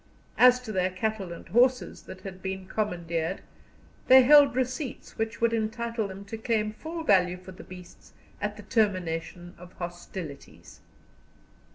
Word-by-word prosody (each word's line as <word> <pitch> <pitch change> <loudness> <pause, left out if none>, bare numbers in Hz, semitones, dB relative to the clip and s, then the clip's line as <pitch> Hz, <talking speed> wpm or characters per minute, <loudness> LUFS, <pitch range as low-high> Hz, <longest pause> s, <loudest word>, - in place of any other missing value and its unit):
As 250 0 +7
to 235 -3 -7
their 185 -2 +1
cattle 195 0 -3
and 170 - -9
horses 250 +2 +2
that 185 - -10
had 185 -1 -9
been 190 0 -4
commandeered, 175 -4 -2 0.7
they 260 0 +9
held 285 0 +7
receipts 255 +1 -3
which 225 0 -3
would 230 0 +2
entitle 230 0 -2
them 195 +1 -9
to 220 +2 -7
claim 220 -2 0
full 325 +7 -6
value 180 - +3
for 185 +1 -12
the 185 - -12
beasts 180 -1 -13 0.3
at - - -3
the - - -10
termination 175 -5 -1
of 180 0 -13
hostilities. 175 -3 -8
200 Hz, 150 wpm, -27 LUFS, 180-235 Hz, 0.7 s, they